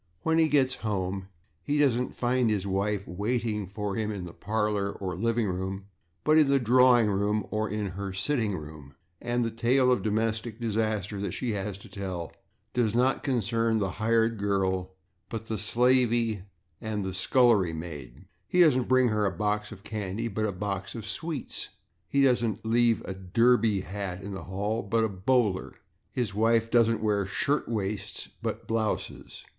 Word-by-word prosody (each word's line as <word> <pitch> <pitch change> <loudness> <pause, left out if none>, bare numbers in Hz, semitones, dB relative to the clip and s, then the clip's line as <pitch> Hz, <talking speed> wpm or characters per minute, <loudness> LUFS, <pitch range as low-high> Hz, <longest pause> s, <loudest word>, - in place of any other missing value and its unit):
When 160 0 +2
he 160 - +5
gets 135 -4 +3
home, 95 -3 -2 0.3
he 145 0 -1
doesn't 125 -4 +2
find 125 -1 +1
his 100 -3 0
wife 100 +1 -1
waiting 105 +1 -2
for 105 +1 -4
him 110 -1 -1
in 100 -4 -5
the 85 - -9
/parlor/ 105 -1 -1
or 95 -2 -3
/living 115 +4 +1
room/, 95 +1 -3 0.4
but 155 +1 +5
in 150 - +5
the 140 0 +4
/drawing 125 0 +5
room/ 105 0 0
or 110 0 -1
in 105 -1 -2
her 100 +2 -5
/sitting 105 +1 -1
room/, 75 -2 -11 0.3
and 120 0 0
the 115 - -2
tale 125 +3 +3
of 125 - +2
domestic 110 +1 -1
disaster 110 -3 -1
that 100 - -3
she 125 -3 -2
has 100 -1 -3
to 100 - -14
tell 95 -4 -5 0.4
does 115 -3 +1
not 130 +2 +2
concern 115 -3 +1
the 95 -3 0
/hired 115 +2 +1
girl/ 95 -2 0 0.3
but 115 -1 -5
the 115 - -4
/slavey/ 120 -3 +2 0.4
and 110 -3 -3
the 95 - -2
/scullery 100 -3 +3
maid/. 75 -7 -8 0.2
He 180 - +3
doesn't 130 -7 +4
bring 130 -1 +4
her 105 -1 +1
a - - 0
box 105 +3 -1
of 100 -2 -11
/candy/, 105 +1 -4
but 110 +2 0
a - - -1
box 100 +1 -4
of 115 - -5
/sweets/. 155 +8 -4 0.4
He 140 +6 +2
doesn't 115 -5 +1
leave 115 0 +3
a 95 - -5
/derby/ 105 +2 +2
hat 95 -1 -5
in 100 - -6
the 95 - -6
hall, 105 +4 -2
but 115 +3 +1
a 110 - +1
/bowler/. 95 - +1 0.4
His 120 -6 -2
wife 115 +2 +2
doesn't 115 -1 +3
wear 105 -2 +1
/shirtwaists/ 105 -5 -2
but - - -4
/blouses 110 -1 -3
110 Hz, 170 wpm, -28 LUFS, 100-120 Hz, 0.4 s, he